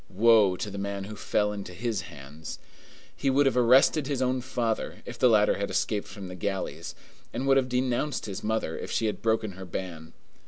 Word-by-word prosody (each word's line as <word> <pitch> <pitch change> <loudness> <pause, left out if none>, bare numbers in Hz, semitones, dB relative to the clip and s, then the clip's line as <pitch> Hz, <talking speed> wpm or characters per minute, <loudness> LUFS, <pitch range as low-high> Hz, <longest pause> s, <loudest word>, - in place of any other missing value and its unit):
Woe 105 -2 +5
to 100 +3 -4
the 100 - -5
man 100 0 -3
who 105 +2 -7
fell 105 0 0
into 100 -3 -7
his 110 0 -2
hands! 75 0 -9 0.6
He 135 - 0
would 140 +2 +4
have 135 - +2
arrested 130 +4 +5
his 140 -3 -1
own 130 0 +1
father, 120 -3 -2
if 120 -1 -8
the 125 - +6
latter 105 -3 +4
had 100 - -1
escaped 105 -2 -1
from 100 -3 -8
the 90 - -7
galleys, 95 +1 -4 0.4
and 125 +3 -3
would 135 0 +5
have 130 -1 +1
denounced 125 +3 0
his 100 -1 -6
mother, 110 -7 -1
if - - -6
she 115 - 0
had 105 - -2
broken 110 -2 +1
her 95 0 -9
ban. 85 -3 -6
110 Hz, 205 wpm, -28 LUFS, 95-125 Hz, 0.6 s, the